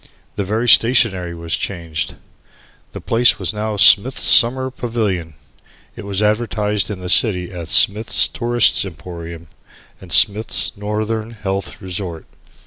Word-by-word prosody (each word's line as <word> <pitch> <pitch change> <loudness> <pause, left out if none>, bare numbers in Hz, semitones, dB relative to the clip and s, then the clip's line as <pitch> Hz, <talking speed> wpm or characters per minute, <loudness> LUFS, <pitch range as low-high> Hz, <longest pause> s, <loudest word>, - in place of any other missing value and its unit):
The 100 - -2
very 110 +5 -2
stationery 110 -8 +3
was 85 -1 -3
changed. 85 -5 -5 0.8
The - - -8
place 120 +1 +2
was - - -4
now 105 0 -4
Smith's 105 +6 +5
Summer 130 +2 +4
Pavilion. 105 - -4 0.6
It - - -10
was 100 +1 -2
advertised 105 -2 -1
in 100 -3 -6
the 90 - -6
city 90 -2 +2
as 85 -3 -8
Smith's 105 +6 +3
Tourists' 120 -2 +1
Emporium, 85 -1 -9 0.6
and 90 -2 -13
Smith's 100 -2 +3
Northern 110 +2 -4
Health 100 -5 -6
Resort. 90 -3 -6
105 Hz, 130 wpm, -17 LUFS, 90-110 Hz, 0.8 s, Smith's